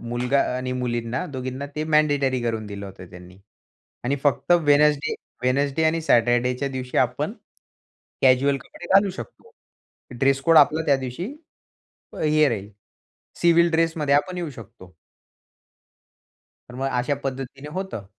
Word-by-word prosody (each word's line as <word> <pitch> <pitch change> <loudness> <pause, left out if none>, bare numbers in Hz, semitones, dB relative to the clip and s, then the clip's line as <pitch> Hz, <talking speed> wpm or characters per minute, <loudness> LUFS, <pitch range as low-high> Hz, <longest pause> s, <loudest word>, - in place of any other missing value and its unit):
मुलगा 120 +3 0 0.2
आणि 125 0 -3
मुलींना 120 +1 -2
दोघींना 130 +1 -5
ते 155 - -1
मँडेटरी 145 -4 +2
करून 110 -2 -2
दिलं 100 -1 -7
होतं 95 -2 -12
त्यांनी. 90 +1 -13 0.7
आणि 140 +3 0
फक्त 145 +4 +2
वेडनेसडे 150 -2 +3 0.3
वेडनेसडे 140 +4 +1
आणि 160 +1 +2
सॅटरडेच्या 125 0 +2
दिवशी 130 -1 -5
आपण, - - 0 0.9
कॅज्युअल 135 +2 +4
कपडे - - -12
घालू 195 0 +5
शकतो. 325 - -10 0.7
ड्रेस 135 0 +2
कोड 165 +2 +4
आपला 155 +2 +4
त्या 140 - +4
दिवशी 130 +6 -5 1.0
हे 155 -1 +4
राहील, 105 -3 -4 0.7
सिव्हिल 170 0 +4
ड्रेसमध्ये 165 -3 +1
आपण 180 +6 +1
येऊ 170 -3 -4
शकतो. 95 -7 -13 1.8
तर 125 - -11
मग 135 +1 -2
अशा 125 +4 0
पद्धतीने 135 +2 -5
होतं 185 - -5
135 Hz, 130 wpm, -23 LUFS, 125-150 Hz, 1.8 s, घालू